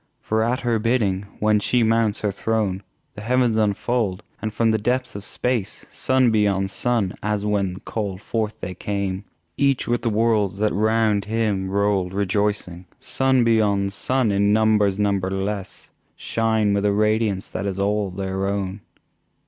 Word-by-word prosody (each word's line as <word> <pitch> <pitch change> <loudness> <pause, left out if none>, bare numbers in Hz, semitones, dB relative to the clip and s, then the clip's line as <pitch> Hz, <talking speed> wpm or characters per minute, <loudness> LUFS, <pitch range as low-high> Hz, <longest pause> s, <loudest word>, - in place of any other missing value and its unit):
For 110 0 -1
at 120 +4 0
her 120 -3 +1
bidding, 105 -4 0
when 105 0 +3
She 120 +3 +2
mounts 115 -1 +1
her 105 - 0
throne 100 -2 -1 0.3
The - - -9
Heavens 120 0 +2
unfold, 110 -1 0 0.2
and 110 - -2
from 115 +1 +2
the 110 - +1
depths 125 +4 -1
of 100 - -7
Space 120 -1 -3
Sun 130 -2 +2
beyond 100 -3 +1
Sun, 115 -6 0
as 105 -1 -1
when 100 -3 -1
called 100 -4 -4
forth 110 +1 -3
they 90 - -4
came, 100 0 -3 0.3
Each 140 -2 +1
with 120 0 0
the 115 - 0
worlds 105 -3 +1
that 105 +1 +1
round 110 0 +2
him 105 -3 -1
rolled 100 -2 0
rejoicing, 100 -2 -1
Sun 130 -2 +1
beyond 100 -4 +2
Sun 120 +5 0
in 100 +1 +2
numbers 105 -2 +3
numberless 100 0 -2 0.2
Shine 110 -2 0
with 100 0 0
a 100 - +3
radiance 105 -2 0
that 100 - -3
is 95 -1 -3
all 100 0 0
their 95 +1 -3
own! 100 0 -3
105 Hz, 155 wpm, -22 LUFS, 100-115 Hz, 0.3 s, when